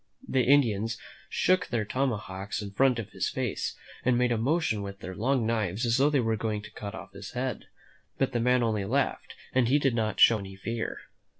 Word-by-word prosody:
The 130 - +2
Indians 115 -5 +3 0.3
shook 185 -1 +2
their 115 -3 -1
tomahawks 105 -6 -2
in 105 -2 -5
front 130 +4 +3
of 105 -2 -5
his 95 -1 -1
face, 125 -5 -3 0.3
and 125 -1 +3
made 125 0 +2
a 120 - +2
motion 135 -4 +1
with 100 0 -7
their 95 - -7
long 120 +4 +1
knives 110 -1 0
as 115 +1 +2
though 140 +2 +4
they 145 -2 +2
were 115 -2 +1
going 105 -1 -2
to - - -10
cut 105 +1 -7
off 100 0 -9
his - - -9
head, 125 0 -3 0.5
but - - +1
the 120 - 0
man 125 +1 +3
only 110 -3 0
laughed 130 +7 -1 0.2
and 130 -2 +3
he 135 +4 +4
did 135 -3 +2
not 110 -3 -1
show 115 -2 +7
any 95 -1 -8
fear. 115 +4 -4
115 Hz, 210 wpm, -28 LUFS, 105-130 Hz, 0.5 s, show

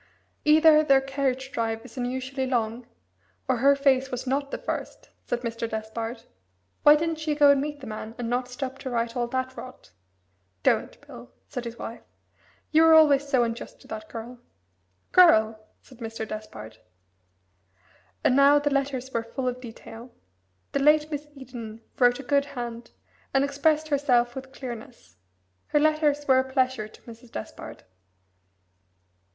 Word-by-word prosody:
"Either 310 0 +6
their 275 -3 +5
carriage 270 -1 -2
drive 225 -1 -2
is 255 - -13
unusually 260 +1 -3
long, 235 -1 -2 0.6
or 260 -2 +1
her 280 +4 +5
face 270 -1 +2
was 250 0 -5
not 275 +2 -1
the - - -4
first," - - -6 0.2
said 240 - -2
Mr. 230 -1 -4
Despard. 225 +1 -5 0.6
"Why 295 - +8
didn't 325 +1 -1
she 310 -1 -1
go 290 -1 +6
and 280 -1 +3
meet 295 0 -5
the - - -8
man, 215 0 -7
and 240 -2 -4
not 245 +1 -1
stop 265 +1 -6
to 260 - -5
write 235 -1 -2
all 240 -1 -1
that 260 +1 -3
rot?" 255 - -11 0.7
"Don't, - - +1
Bill," 120 0 -12 0.2
said 250 -1 -6
his 235 0 -7
wife. 230 - -7 0.7
"You 315 +1 +5
were 325 0 +7
always 290 -3 +5
so 255 -3 +3
unjust 230 0 -5
to - - -17
that 215 0 -7
girl." 235 +2 -8 0.7
"Girl!" 220 -12 +5 0.2
said 255 -3 -17
Mr. 225 -1 -5
Despard. 110 - -8 1.4
And 255 - +3
now 280 +1 +6
the 290 0 0
letters 270 -2 -2
were 230 - 0
full 255 +3 -5
of 250 0 -3
detail: 235 0 -10 0.6
the - - 0
late 300 +2 +4
Miss 295 0 -4
Eden 240 -5 -9 0.2
wrote 245 0 +4
a - - -7
good 280 +1 +2
hand, 240 -4 -7 0.5
and 270 - +4
expressed 300 +2 +1
herself 250 -4 +2
with 265 0 -8
clearness. 225 - -9 0.5
Her 295 - +2
letters 300 -1 +2
were 260 -1 +5
a 260 0 -3
pleasure 260 -4 0
to 215 - -18
Mrs. 230 0 -13
Despard. 110 - -8
260 Hz, 160 wpm, -26 LUFS, 230-280 Hz, 1.4 s, Why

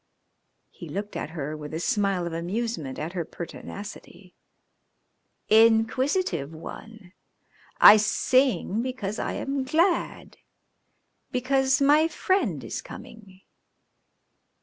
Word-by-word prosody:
He - - -11
looked 205 +1 -5
at - - -4
her 155 -2 -5
with 150 0 -7
a - - -2
smile 195 -1 0
of 170 - -5
amusement 175 - -3
at 165 +3 -5
her 175 -2 -2
pertinacity. 185 +2 -10 1.1
"Inquisitive 225 - +2
one! 195 +3 -11 0.7
I 215 - +10
sing 225 -1 +1
because 235 -5 -4
I - - -2
am 275 0 -2
glad. 335 +7 0 0.9
Because 265 +1 +1
my 300 +3 +5
friend 270 - -1
is 115 - -5
coming." 215 -6 -13
215 Hz, 105 wpm, -25 LUFS, 175-260 Hz, 1.1 s, I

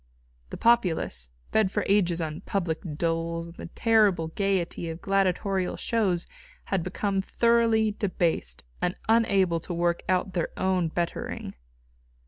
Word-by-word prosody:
The - - -6
populace, 175 - +2 0.2
fed 215 -4 +3
for - - -1
ages 180 -4 +2
on 155 -1 -4
public 170 -5 -2 0.2
doles 165 0 -1
and 170 0 -11
the - - -7
terrible 200 -5 +2
gaiety 185 -2 -1
of 165 +1 -6
gladiatorial 195 0 0
shows 195 -7 0 0.4
had 195 -2 0
become 195 +2 -1
thoroughly 230 0 +3
debased, 170 - -1 0.2
and 180 0 0
unable 200 -6 +3
to 175 +2 -6
work 170 0 +1
out 185 +1 +1
their 175 -2 -1
own 185 -2 +1
bettering. 170 +1 -3
185 Hz, 130 wpm, -27 LUFS, 170-200 Hz, 0.4 s, fed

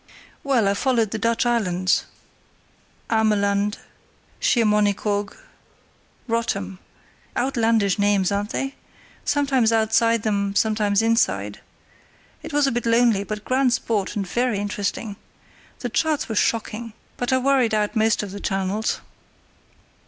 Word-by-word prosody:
"Well, 255 -7 +2
I 200 - +3
followed 230 -1 +1
the 220 - -3
Dutch 230 +2 +1
islands, 185 -6 +1 1.1
Ameland, 205 -2 +1 0.6
Schiermonnikoog, 210 -2 +1 0.9
Rottum 225 - -2 0.6
(outlandish 225 -6 +1
names, 200 -2 +2
aren't 200 +1 -1
they?), 270 +3 -3 0.5
sometimes 275 -5 +2
outside 225 0 +2
them, 200 -2 -1
sometimes 210 -1 +2
inside. 230 +1 +1 0.8
It - - -8
was 290 -1 +2
a 270 - +1
bit 240 0 -2
lonely, 230 -3 +3
but 210 0 -6
grand 255 -1 +2
sport 215 -4 -1
and 200 -2 -2
very 240 +3 0
interesting. 205 0 -3 0.6
The 245 - -3
charts 300 +5 0
were 225 - -3
shocking, 225 +1 -1 0.2
but 245 - -2
I 260 - +4
worried 260 -4 +2
out 210 +2 0
most 220 -1 +2
of 200 - -6
the 200 - -7
channels." 195 +3 -1
220 Hz, 125 wpm, -23 LUFS, 205-235 Hz, 1.1 s, I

